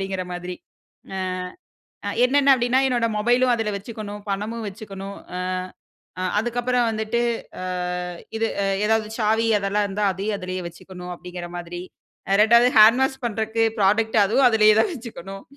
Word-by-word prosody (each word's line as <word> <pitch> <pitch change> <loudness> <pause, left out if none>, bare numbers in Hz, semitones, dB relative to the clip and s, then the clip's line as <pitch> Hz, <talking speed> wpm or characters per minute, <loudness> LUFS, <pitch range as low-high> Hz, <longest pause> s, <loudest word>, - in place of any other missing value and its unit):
அப்பிடிங்கிற 190 -1 -3
மாதிரி 180 +1 -5 0.6
அ, - - -3 0.9
அ. - - 0 0.2
என்னென்ன 280 +2 +4
அப்பிடின்னா, 245 +1 +2
என்னோட 240 -3 +1
மொபைலும் 245 +4 +3
அதுல 225 -2 -2
வச்சுக்கணும், 210 0 -7
பணமும் 215 +3 -3
வச்சுக்கணும். 200 -1 -8 0.2
அ, - - -3 0.8
அ - - -2 0.2
அதுக்கப்புறம் 240 +1 0
வந்துட்டு 220 +2 -1 0.4
அ - - -4 0.7
இது 225 0 +1 0.2
அ - - 0 0.2
எதாவது 220 0 +1
சாவி 220 +1 +2
அதெல்லாம் 200 +1 0
இருந்தா 205 +1 -1
அதையும் 200 +3 -2
அதிலேயே 185 0 -4
வச்சுக்கணும் 180 +1 -10
அப்பிடிங்கிற 175 0 -8
மாதிரி. 175 0 -6 0.5
அ - - +3
2வது 235 +3 +6
ஹேண்ட் 225 +4 +7
வாஷ் 265 0 -2
பண்றக்கு 220 0 -1
புராடக்ட் 220 +3 +2
அதுவும் 250 +6 +4
அதுலேயே 215 -2 +5
தான் 415 - +2
வச்சுக்கணும் 195 - -9
215 Hz, 145 wpm, -23 LUFS, 195-235 Hz, 0.9 s, ஹேண்ட்